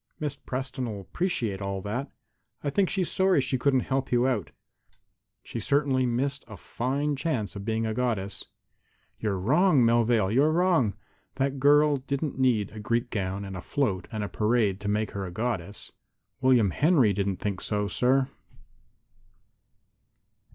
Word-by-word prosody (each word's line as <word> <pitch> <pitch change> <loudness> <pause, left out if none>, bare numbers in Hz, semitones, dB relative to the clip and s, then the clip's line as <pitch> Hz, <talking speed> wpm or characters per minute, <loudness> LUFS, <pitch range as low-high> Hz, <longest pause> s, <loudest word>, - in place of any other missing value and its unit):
"Miss 150 -2 -2
Preston'll 130 -5 -4
appreciate 110 - -2
all 100 0 -3
that. 125 +7 -3 0.5
I 145 - -1
think 190 +5 +2
she's 185 -2 -1
sorry 190 -3 +3
she 130 -1 0
couldn't 130 0 +3
help 135 +1 -2
you 120 0 +3
out. 110 - 0 0.9
She 115 - -6
has 110 - -5
certainly 140 -2 +2
missed 135 +4 -1
a 110 -3 -10
fine 140 - -2
chance 130 - -2
of 100 0 -6
being 110 0 0
a 110 - -1
goddess." 110 -5 -2 0.7
"You're 105 -3 -1
wrong, 145 - +4
Melvale; 115 -3 +3
you're 145 +5 +4
wrong! 165 - +2 0.4
That 135 0 -1
girl 145 +1 +5
doesn't 140 +1 -3
need 115 -6 +2
a 110 - -9
Greek 115 +3 -1
gown 100 0 -2
and 95 -1 -7
a 90 - -5
float 100 -5 -1
and 110 -2 -3
a - - -2
parade 105 0 +1
to 100 - -6
make 105 +1 0
her 100 - -4
a 90 - -5
goddess." 105 -2 -4 0.5
"William 125 -7 +4
Henry 140 - +3
don't 100 0 -1
think 100 -3 -3
so, 105 -1 -1
sir." 130 +6 +2
120 Hz, 160 wpm, -27 LUFS, 105-140 Hz, 0.9 s, girl